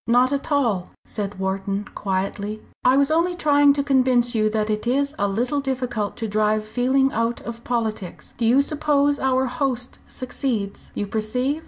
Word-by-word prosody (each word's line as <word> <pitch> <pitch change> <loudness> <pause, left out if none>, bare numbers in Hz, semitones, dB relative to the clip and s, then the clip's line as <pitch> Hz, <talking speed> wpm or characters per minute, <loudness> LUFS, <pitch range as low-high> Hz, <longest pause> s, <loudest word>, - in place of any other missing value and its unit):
"Not 250 +3 +4
at 280 +2 -3
all," 230 -11 +1 0.2
said 205 -1 -5
Wharton, 195 +1 -2
quietly, 200 +2 -3 0.2
"I 255 +2 +5
was 280 +1 +3
only 340 +3 +2
trying 290 -3 +4
to 280 0 -1
convince 255 -3 +3
you 215 -2 +2
that 215 0 -1
it 215 +2 -2
is 280 +3 +1
a 205 - +2
little 240 +8 0
difficult 250 -6 -2
to 225 - -3
drive 215 +1 +1
feeling 260 +4 +2
out 230 +1 -1
of 235 0 -8
politics. 220 -6 -3
Do 235 - -4
you 255 +4 +5
suppose 290 -1 +1
our 265 0 +2
host 255 -1 -2
succeeds? 240 -5 -3
You 205 - -2
perceive? 250 +8 -1
245 Hz, 170 wpm, -23 LUFS, 215-275 Hz, 0.2 s, I